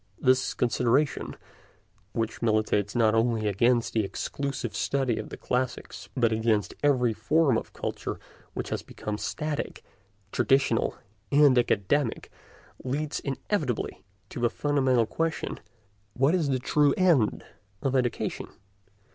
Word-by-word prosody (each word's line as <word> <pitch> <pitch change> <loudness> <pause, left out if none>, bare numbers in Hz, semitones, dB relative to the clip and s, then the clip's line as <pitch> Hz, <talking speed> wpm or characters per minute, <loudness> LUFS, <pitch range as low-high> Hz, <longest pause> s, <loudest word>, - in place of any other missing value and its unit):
This 130 +1 +2
consideration, 125 +4 +1 0.8
which 115 0 -3
militates 110 -2 +1
not 110 -2 +4
only 115 -1 +1
against 120 +4 +2
the 110 - +2
exclusive 140 +7 -4
study 135 -4 0
of - - -6
the - - -8
classics, 125 0 -3
but 115 -2 +3
against 110 -2 +1
every 125 -5 +3
form 150 +2 +2
of - - -3
culture - - -4 0.4
which - - -4
has - - -2
become 105 0 -6
static, 150 -1 -3 0.5
traditional, 135 -4 +2 0.4
and 145 -2 +6
academic, 120 +2 +1 0.5
leads 145 +3 -2
inevitably 140 - -2 0.3
to - - -7
the 120 0 +2
fundamental 130 -4 +2
question: 160 +8 -2 0.6
What 135 +5 +3
is 165 -6 +1
the 130 - +2
true 145 +2 +2
end 165 - +3 0.4
of 135 -1 0
education? 125 -2 -1
125 Hz, 120 wpm, -27 LUFS, 115-140 Hz, 0.8 s, and